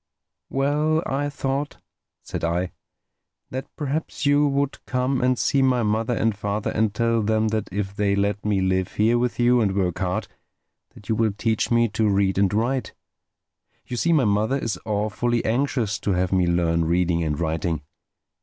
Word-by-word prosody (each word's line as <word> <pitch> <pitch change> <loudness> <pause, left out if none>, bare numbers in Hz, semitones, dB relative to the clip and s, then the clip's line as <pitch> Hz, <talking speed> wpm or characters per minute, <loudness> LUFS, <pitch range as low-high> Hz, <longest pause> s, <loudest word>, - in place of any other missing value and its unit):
"Well, 150 +4 +1
I 145 +2 -1
thought," 140 0 -3 0.5
said - - -5
I, 85 +2 0 0.8
"that 130 +2 -4
perhaps 150 +1 -3
you 145 +1 +4
would 140 0 -1
come 125 +1 0
and 125 0 +2
see 140 - +2
my 130 -2 +3
mother 110 +3 0
and 110 -1 +1
father 105 +1 -2
and 110 -1 +1
tell 115 +2 +1
them 110 +1 +1
that 110 -1 -2
if 100 0 -3
they 100 -1 +1
let 100 0 0
me 105 -2 +1
live 95 -1 0
here 115 +3 +2
with 125 0 -1
you 120 0 +4
and 100 -3 +1
work 90 -3 0
hard, 90 -2 -1 0.7
that 100 - -15
you 115 - +1
will 110 -1 +1
teach 110 0 0
me 115 0 +3
to 110 +1 +1
read 100 -1 +2
and 100 -2 +3
write. 120 +5 -1 0.9
You 125 - -5
see 170 +8 +1
my 150 -6 +4
mother 105 +6 +1
is 115 -8 -3
awfully 110 +3 0
anxious 120 -3 0
to 100 - 0
have 90 0 0
me 90 -2 +2
learn 85 -1 +1
reading 85 0 +1
and 75 -1 -2
writing. 80 -1 -1
110 Hz, 175 wpm, -23 LUFS, 95-125 Hz, 0.9 s, you